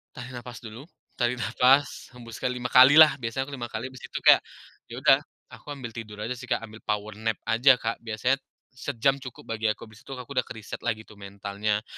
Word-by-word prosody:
tarik 125 +1 -8
nafas 120 0 -9
dulu, 115 +7 -10 0.3
tarik 120 +1 +1
nafas, 130 +3 +2
hembuskan 115 0 -5
5 125 0 -4
kali 130 +4 +8
lah, 155 -1 +9
biasanya 115 +3 -2
aku 145 - -10
5 120 - -4
kali, 120 +4 -5
habis 130 - -10
itu - - -5
kayak, - - +8 0.5
ya - - -9
udah, - - +7 0.3
aku - - -14
ambil 120 -4 -7
tidur 110 -2 -8
aja 115 - -4
sih, 125 0 -6
Kak, - - -1
ambil 110 0 -10
power 105 0 -1
nap 110 -1 0
aja, 125 +4 +5
Kak. 115 -1 -3
Biasanya, 115 +4 -1 0.3
sejam 135 +1 0
cukup 130 -2 -10
bagi 110 0 -1
aku, 110 - -2
habis 110 -2 -14
itu 135 - -9
aku 125 +2 -10
udah - - -1
kereset 110 -2 -8
lagi 110 0 -3
tuh 105 -2 -17
mentalnya, 100 +2 -3
120 Hz, 210 wpm, -26 LUFS, 110-130 Hz, 0.5 s, lah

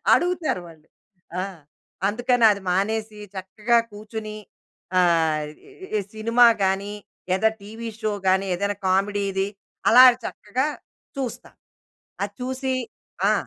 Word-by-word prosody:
అడుగుతారు 350 - 0
వాళ్ళు. 160 -1 -17 0.5
ఆ! - - 0 0.7
అందుకనది 225 -2 +3
మానేసి, 215 +3 -1 0.2
చక్కగా 210 +5 +1
కూచుని, 215 0 -7 0.6
ఆహ్, 160 -3 +3 0.2
ఈ - - -16
ఇ - - -10
ఇ - - +1
సినిమా 230 +2 +5 0.2
కాని, 195 +2 0 0.4
లేదా 190 +4 +4
ఎనిమిదింటికటీవీ 220 +2 -8
షో 215 -2 0 0.2
కాని, 190 +1 +3
ఏదైనా 200 +1 -1
కామెడీది, 195 0 +1 0.4
అలాగ 250 +2 +10 0.2
చక్కగా 250 +7 -2 0.5
చూస్తాం. 255 -3 -5 0.7
అది 205 0 -7
చూసి 260 +1 -2 0.6
ఆ! - - +5
210 Hz, 110 wpm, -24 LUFS, 195-235 Hz, 0.7 s, అలాగ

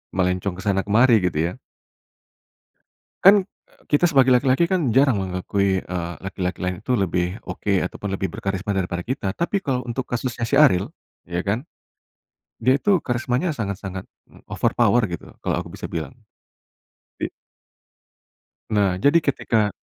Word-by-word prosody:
melencong 90 0 0
ke - - -5
sana 95 -1 +2
kemari 120 +4 +5
gitu 85 -4 -1
ya. 90 - -6 1.7
Kan, 195 +2 +9 0.3
e - - -28 0.2
kita 145 +4 +4
sebagai 135 -4 +5
laki-laki 130 +5 +3
kan 170 -7 +1
jarang 135 -4 +4
mengakui, 95 +1 0
eee, 85 -1 -4
laki-laki 95 -1 -3
lain 90 0 -1
itu - - -3
lebih, 90 -3 0 0.2
oke, 100 - -2
ataupun 105 +3 -5
lebih 95 - -2
berkarisma 100 +1 -3
daripada 90 -2 -2
kita. 120 -7 -2
Tapi 190 +3 -1
kalo 125 -2 -1
untuk 125 +2 -3
kasusnya 120 0 -3
si - - +1
Ariel, 115 -8 +5 0.4
ya 85 0 -2
kan, 105 +6 -1 1.0
dia 130 +3 +4
itu 200 +1 +3
karismanya 125 +6 -1
sangat-sangat 100 -4 -5 0.5
overpower 120 - +2
gitu, 85 -1 -7
kalo - - 0
aku - - -8
bisa - - -6
bilang. - - -4 1.1
Di - - -1 1.5
nah, 100 -3 +2
jadi 145 - +4
ketika 115 -7 +1
105 Hz, 140 wpm, -22 LUFS, 95-130 Hz, 1.7 s, Kan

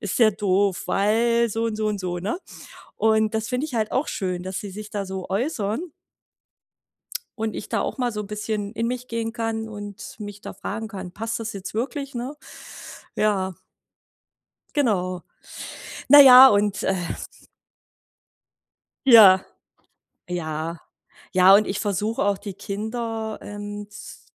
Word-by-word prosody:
ist 205 +2 -3
der 220 -2 +5
doof, 200 -1 +1
weil“ 230 +3 +2
so 225 +1 -2
und 220 -2 -3
so 215 0 -1
und 210 -2 -1
so, 175 -1 -3
ne? 205 - -3 0.6
Und 220 0 +2
das 220 0 -1
find 250 +2 -1
ich 305 -5 -4
halt 220 -2 0
auch 270 - 0
schön, 185 -4 -3
dass 185 0 -4
sie 205 - -7
sich 210 +2 -8
da 200 -2 -3
so 190 -1 -6
äußern 215 - -1 1.6
und 220 0 -2
ich - - -6
da - - 0
auch - - -3
mal 245 -2 0
so 210 -1 -4
bisschen 210 0 -4
in 230 0 -2
mich 250 +1 -4
gehen 230 0 -3
kann 225 -1 -3
und 205 -2 -8
mich 205 -1 -8
da - - -8
fragen 220 +2 -5
kann: 190 -4 -8
„Passt 225 +3 -4
das 225 0 -4
jetzt 195 +1 -7
wirklich“, 275 +4 -3
ne? 250 +4 -4 0.8
Ja. 195 -3 +1 1.2
Genau. 185 -10 0 0.9
Naja 265 -2 +11
und, 205 -1 +1
äh 190 - +1 2.1
Ja, 200 -7 +9 0.9
ja, 165 -1 -4 0.5
ja 185 +1 +7
und 215 - +2
ich 195 +1 -2
versuche 210 +2 -1
auch, 200 -1 +1
die 200 -1 -7
Kinder, 220 +2 -4
ähm, 205 0 -7
z 210 - -11
210 Hz, 150 wpm, -23 LUFS, 195-230 Hz, 2.1 s, Naja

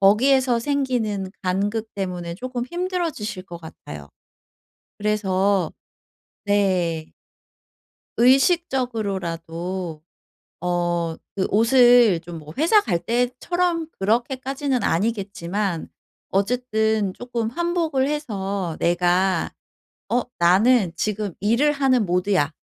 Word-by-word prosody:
거기에서 245 +5 +4
생기는 235 -8 -1
간극 205 +4 -1
때문에 180 -3 -4
쪼금 250 +1 -4
힘들어지실 340 - -3
것 170 -2 -9
같아요. 75 - -10 0.9
그래서 200 -3 +1 0.7
네. 185 -6 +1 1.1
의식적으로라도 195 - 0 0.6
어 175 -2 -1 0.2
그 190 - +1
옷을 235 -3 +5
좀 170 -1 -8
뭐 155 0 -11
회사 335 +8 +5
갈 180 - 0
때처럼 315 - 0
그렇게까지는 260 +5 -1
아니겠지만 200 -2 -1 0.4
어쨌든 220 -1 0
쪼끔 235 -1 -3
환복을 330 -3 0
해서 200 - -3
내가 180 +2 +1 0.6
"어! 245 +1 +2 0.2
나는 190 +3 +4
지금 205 0 -2
일을 235 +9 +3
하는 260 -5 +2
모드야." 180 -3 +1
210 Hz, 215 characters per minute, -23 LUFS, 180-255 Hz, 1.1 s, 옷을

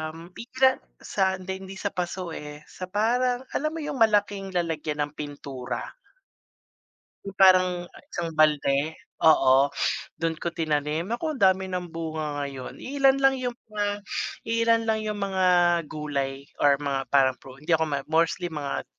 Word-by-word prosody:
m 165 +2 -12
pikla 260 +5 +1 0.2
sa 190 -1 0
hindi, 190 +1 -6
hindi 190 0 -9
sa 200 +1 -3
paso 180 0 -4
eh, 150 -1 -8
sa 185 - -7
parang, 245 +5 +1
alam 305 +2 -1
mo 320 - -4
yung 295 -4 -4
malaking 205 -3 +2
lalagyan 155 -3 -1
ng 145 - -5
pintura? 140 -4 -6 1.3
Yung 195 -1 -8
parang 185 -2 +5 0.3
isang 165 -2 -3
balde? 150 -1 +3 0.3
Oo, 135 -3 +5 0.5
dun 165 -1 0
ko 170 +1 -4
tinanim. 155 +2 -1
Naku, 310 +7 -2
ang 270 - -8
dami 190 0 +4
ng 180 -1 -3
bunga 155 -3 -4
ngayon. 135 -2 -7
Iilan 270 0 +2
lang 270 -1 +3
yung 245 -1 -3 0.2
mga 205 -1 -2 0.4
iilan 230 0 +2
lang 220 -1 +1
yung 215 -1 -3
mga 195 -2 0 0.4
gulay 140 -3 -3 0.2
or 145 -1 +5
mga 140 -2 -3
parang 135 -2 +4
pru 130 -1 -12
hindi 150 +4 -3
ako 160 0 +4
ma 140 -2 -2
mostly 165 +2 +1
mga 145 -3 -3
175 Hz, 155 wpm, -26 LUFS, 150-205 Hz, 1.3 s, parang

